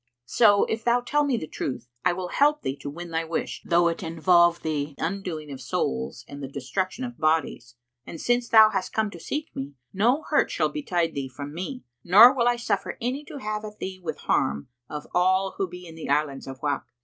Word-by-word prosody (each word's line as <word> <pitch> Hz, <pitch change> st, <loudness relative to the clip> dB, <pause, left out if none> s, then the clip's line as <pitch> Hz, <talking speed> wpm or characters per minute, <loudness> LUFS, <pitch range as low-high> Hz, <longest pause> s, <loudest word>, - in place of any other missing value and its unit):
So, 205 Hz, -, +5 dB
if 220 Hz, 0 st, -3 dB
thou 240 Hz, +1 st, +3 dB
tell 295 Hz, +4 st, +1 dB
me 275 Hz, -4 st, +1 dB
the 155 Hz, -, -4 dB
truth, 125 Hz, -5 st, -5 dB, 0.2 s
I 180 Hz, -, +4 dB
will 180 Hz, 0 st, -4 dB
help 295 Hz, +6 st, +2 dB
thee 135 Hz, -, -2 dB
to 140 Hz, +1 st, -6 dB
win 170 Hz, +3 st, -8 dB
thy 165 Hz, 0 st, 0 dB
wish, 165 Hz, 0 st, -3 dB
though 170 Hz, 0 st, +3 dB
it 165 Hz, 0 st, -2 dB
involve 170 Hz, 0 st, +3 dB
the 150 Hz, -2 st, -2 dB
undoing 165 Hz, -4 st, -4 dB
of 135 Hz, -, -8 dB
souls 65 Hz, -, -2 dB
and 140 Hz, 0 st, -9 dB
the 135 Hz, -, -4 dB
destruction 185 Hz, -, -3 dB
of 245 Hz, -1 st, -6 dB
bodies; 155 Hz, -6 st, 0 dB, 0.3 s
and 165 Hz, -, -9 dB
since 240 Hz, 0 st, +1 dB
thou 220 Hz, -1 st, +8 dB
hast 195 Hz, -3 st, -2 dB
come 220 Hz, -2 st, 0 dB
to 170 Hz, -, -10 dB
seek 300 Hz, -, -5 dB
me, 140 Hz, +1 st, -6 dB, 0.2 s
no 240 Hz, +10 st, +2 dB
hurt -, -, +3 dB
shall -, -, +1 dB
betide 175 Hz, -, -1 dB
thee 135 Hz, -1 st, -4 dB
from 140 Hz, +3 st, -8 dB
me, 220 Hz, -, -5 dB, 0.2 s
nor 220 Hz, +8 st, +9 dB
will 240 Hz, -3 st, +1 dB
I 245 Hz, -, +4 dB
suffer 220 Hz, -4 st, -2 dB
any 255 Hz, +5 st, -2 dB
to -, -, -8 dB
have 215 Hz, -4 st, -4 dB
at 210 Hz, 0 st, -8 dB
thee 190 Hz, 0 st, -6 dB
with 175 Hz, -, -4 dB
harm 70 Hz, -, 0 dB, 0.2 s
of 150 Hz, -1 st, -6 dB
all 185 Hz, +2 st, +2 dB
who 195 Hz, -, +1 dB
be 180 Hz, +1 st, -10 dB
in 165 Hz, -, -10 dB
the 160 Hz, -3 st, -7 dB
Islands 140 Hz, -2 st, 0 dB
of 135 Hz, -1 st, -9 dB
Wak." 140 Hz, -4 st, -1 dB
175 Hz, 220 wpm, -25 LUFS, 150-220 Hz, 0.3 s, nor